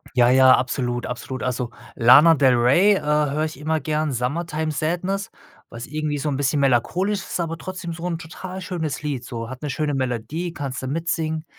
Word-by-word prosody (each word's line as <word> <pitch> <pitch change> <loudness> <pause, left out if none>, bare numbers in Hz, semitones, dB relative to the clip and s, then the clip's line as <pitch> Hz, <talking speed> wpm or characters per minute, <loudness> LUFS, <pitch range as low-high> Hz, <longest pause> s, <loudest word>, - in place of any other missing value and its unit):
Ja, 120 -1 +5
ja, 130 0 +7
absolut, 120 -1 -2
absolut. 125 0 -5
Also, 125 -1 -2 0.2
Lana 150 +8 +7
del 130 -3 +4
Rey, 170 +13 +5
äh, - - -2
höre 150 0 +1
ich 155 -4 -5
immer 155 +1 0
gern, 155 -1 -1
„Summertime 155 +5 -2
Sadness“, 180 +6 -2 0.4
was 115 +1 -8
irgendwie 150 0 -2
so 150 - -2
'n 135 - -1
bisschen 145 +1 0
melancholisch 175 - +1
ist, - - -5
aber 165 -1 -2
trotzdem 180 0 -6
so 165 +2 -6
'n 165 -2 -2
total 185 +3 -8
schönes 160 -6 -4
Lied, 140 -5 -3
so 115 -3 -6
hat 130 +2 -9
'ne 145 - -3
schöne 150 -1 -1
Melodie, 135 +7 -3
kannste 130 -3 -5
mitsingen. 160 0 -2
150 Hz, 185 wpm, -22 LUFS, 130-165 Hz, 0.4 s, ja